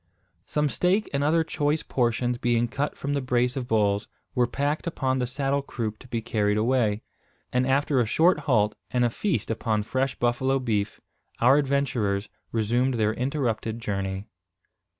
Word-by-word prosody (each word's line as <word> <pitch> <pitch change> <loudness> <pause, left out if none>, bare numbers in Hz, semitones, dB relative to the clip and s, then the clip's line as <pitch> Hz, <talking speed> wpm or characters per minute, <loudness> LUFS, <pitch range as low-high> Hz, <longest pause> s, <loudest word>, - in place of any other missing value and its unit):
Some 150 0 +1
steak 180 +8 +1
and 140 0 +1
other 160 +3 +3
choice 150 -1 0
portions, 120 0 0
being 120 0 +2
cut 140 +4 -3
from 140 +1 -2
the 140 - 0
brace 125 -1 +1
of 130 -3 -3
bulls, 105 -3 +1 0.3
were 125 -1 +2
packed 145 +6 -1
upon 130 -5 0
the 125 - 0
saddle 135 +2 0
croup 110 -5 -4
to 130 - -14
be 115 -2 -3
carried 105 -2 +1
away; 110 -2 +1 0.5
and 125 +1 +2
after 135 0 +2
a 120 - +3
short 165 +9 +4
halt, 105 -4 +3 0.2
and 125 -1 +2
a 120 - +1
feast 145 - -1
upon 110 -2 0
fresh 130 +4 -1
buffalo 125 +3 +1
beef, 110 -5 -1 0.4
our 130 +4 +6
adventurers 135 -8 0 0.2
resumed 120 +4 +1
their 110 -1 +1
interrupted 120 -4 -1
journey. 100 -2 -3
125 Hz, 165 wpm, -26 LUFS, 110-140 Hz, 0.5 s, our